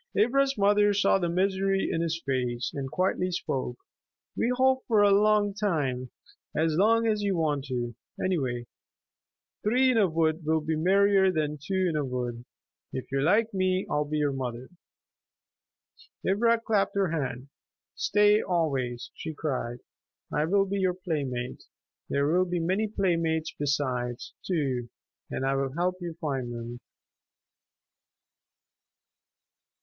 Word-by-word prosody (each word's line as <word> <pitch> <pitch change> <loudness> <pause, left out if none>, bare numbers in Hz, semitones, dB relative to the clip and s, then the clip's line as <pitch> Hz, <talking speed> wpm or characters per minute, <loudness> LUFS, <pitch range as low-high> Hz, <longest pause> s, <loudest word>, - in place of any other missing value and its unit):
Ivra's 270 +5 +3
mother 205 0 +4
saw 195 -1 +3
the 175 -2 0
misery 195 +2 +1
in 165 - 0
his 165 0 -1
face 125 -3 -1
and 135 -2 -4
quietly 185 +2 0
spoke, 130 -8 -3 0.6
"We 235 - +1
hope 260 0 +3
for 215 -3 +4
a 205 - +5
long 205 0 +4
time. 145 - -1 0.5
As 160 0 +2
long 225 +5 +4
as 215 -2 +1
you 200 -3 0
want 150 -4 0
to, 120 -3 -3 0.3
anyway. 130 -10 -1 1.0
Three 255 +5 +3
in 230 - +3
a 195 -4 +4
wood 160 0 +1
will 160 +1 +1
be 155 +1 -1
merrier 190 +3 +4
than 150 -3 -2
two 190 +3 0
in 165 - -1
a 150 - +1
wood.... 125 -2 -4 0.5
If 130 - -6
you 135 0 +1
like 215 +8 +3
me 185 0 +1
I - - 0
will 150 - +1
be 150 +1 -2
your 145 -1 +1
mother." 125 -1 -5 1.6
Ivra 230 +4 +3
clapped 215 -4 0
her 195 -4 +1
hands. 135 -4 -3 0.5
"Stay 210 +1 +3
always," 135 -9 -1
she 160 -1 -6
cried. 125 -5 -3 0.5
"I 150 - +2
will 195 +4 +3
be 200 +1 -2
your 185 -2 +1
playmate. 140 -9 -4 0.4
There 140 0 +1
will 175 +5 +3
be 175 -1 -2
many 190 +6 0
playmates 165 -6 0
besides, 130 -4 -2
too, 135 -9 -1 0.4
and 135 - -3
I 135 - +2
will 135 -1 -1
help 180 +3 0
you 170 -2 -5
find 135 -6 -2
them." 120 +1 -6
165 Hz, 145 wpm, -28 LUFS, 135-200 Hz, 1.6 s, a